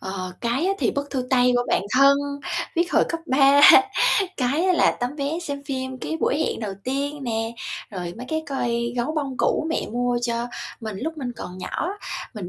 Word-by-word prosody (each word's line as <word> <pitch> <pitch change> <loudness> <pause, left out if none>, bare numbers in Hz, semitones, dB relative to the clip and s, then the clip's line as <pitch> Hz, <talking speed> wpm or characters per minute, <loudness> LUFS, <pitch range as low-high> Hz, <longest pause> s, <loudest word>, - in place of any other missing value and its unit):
ờ, 185 -1 -5
cái 245 +9 0
á 390 - +2
thì - - +2
bức 280 0 -4
thư 255 -2 -2
tay 250 -1 +4
của 245 - +2
bạn - - +2
thân, 275 +1 +6 0.6
viết 345 +1 +1
hồi - - +5
cấp 330 - -3
3, 275 +1 +5 0.8
cái 275 +7 +1
á 370 - +4
là 350 - +4
tấm 250 +4 -2
vé 290 +3 -2
xem 285 -3 -5
phim 260 -2 -4
cái 320 - -3
buổi 285 - +1
hẹn 315 - -1
đầu 210 -3 -3
tiên 280 +2 -2
nè, 225 -1 -2 0.4
rồi 180 -3 -5
mấy 250 +2 -8
cái 315 0 -1
coi 235 -3 -1
gấu 245 +6 -1
bông 275 -4 -2
cũ - - +1
mẹ - - -1
mua 245 0 0
cho 235 0 -1 0.3
mình 220 -3 -5
lúc 315 +8 -3
mình 250 -4 -4
còn 180 +1 -8
nhỏ. 335 - -3 0.5
Mình 200 -5 -6
260 Hz, 205 wpm, -23 LUFS, 235-285 Hz, 0.8 s, thân